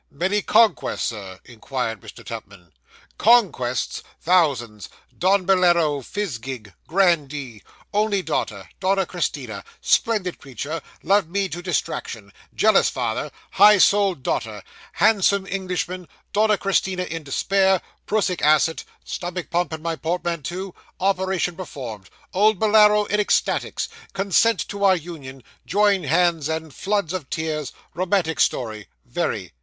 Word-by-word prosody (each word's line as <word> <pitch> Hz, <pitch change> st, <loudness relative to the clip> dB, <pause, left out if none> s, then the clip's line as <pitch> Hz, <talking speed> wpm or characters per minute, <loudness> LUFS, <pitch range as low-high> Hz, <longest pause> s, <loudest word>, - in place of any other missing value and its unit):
'Many 190 Hz, +8 st, 0 dB
conquests, 225 Hz, +1 st, +2 dB
sir?' 95 Hz, -4 st, -8 dB
inquired 120 Hz, -2 st, -4 dB
Mr. -, -, -12 dB
Tupman. 100 Hz, -6 st, -9 dB, 0.5 s
'Conquests! 190 Hz, -, +2 dB, 0.2 s
Thousands. 135 Hz, -, +1 dB, 0.3 s
Don 185 Hz, +1 st, +2 dB
Bolaro 170 Hz, -6 st, +3 dB
Fizzgig 130 Hz, -, -5 dB
grandee 150 Hz, -, 0 dB, 0.3 s
only 205 Hz, -2 st, +1 dB
daughter 105 Hz, -, -3 dB
Donna 195 Hz, 0 st, +1 dB
Christina 140 Hz, -, -4 dB, 0.2 s
splendid 210 Hz, -6 st, +1 dB
creature 145 Hz, +4 st, -5 dB, 0.2 s
loved 195 Hz, -1 st, +2 dB
me 195 Hz, +2 st, 0 dB
to 175 Hz, -, -5 dB
distraction 115 Hz, -, -3 dB, 0.2 s
jealous 215 Hz, -2 st, +4 dB
father 125 Hz, +3 st, -2 dB, 0.2 s
high 205 Hz, +2 st, +7 dB
souled 195 Hz, -6 st, +3 dB
daughter 110 Hz, -5 st, -2 dB, 0.3 s
handsome 200 Hz, -2 st, +3 dB
Englishman 185 Hz, -2 st, -3 dB, 0.3 s
Donna 210 Hz, 0 st, +3 dB
Christina 190 Hz, -2 st, 0 dB
in 165 Hz, -2 st, -5 dB
despair 190 Hz, +6 st, +2 dB, 0.3 s
prussic 200 Hz, -4 st, 0 dB
acid 155 Hz, +2 st, +3 dB, 0.2 s
stomach 175 Hz, 0 st, -5 dB
pump 175 Hz, 0 st, 0 dB
in 160 Hz, 0 st, -6 dB
my 165 Hz, -1 st, -1 dB
portmanteau 175 Hz, +2 st, -3 dB, 0.3 s
operation 190 Hz, -2 st, 0 dB
performed 125 Hz, -, -8 dB, 0.2 s
old 210 Hz, +2 st, +4 dB
Bolaro 210 Hz, -1 st, +5 dB
in 210 Hz, +1 st, 0 dB
ecstasies 210 Hz, -, 0 dB, 0.3 s
consent 200 Hz, +4 st, +2 dB
to 200 Hz, 0 st, -4 dB
our 190 Hz, -1 st, +6 dB
union 145 Hz, -7 st, -8 dB, 0.2 s
join 200 Hz, -4 st, +2 dB
hands 165 Hz, 0 st, +2 dB
and 160 Hz, -2 st, -4 dB
floods 200 Hz, -4 st, -1 dB
of 175 Hz, -8 st, -5 dB
tears 155 Hz, -3 st, -3 dB, 0.2 s
romantic 180 Hz, -3 st, 0 dB
story 110 Hz, -4 st, 0 dB, 0.2 s
very. 120 Hz, -, -3 dB
175 Hz, 120 wpm, -22 LUFS, 135-195 Hz, 0.5 s, high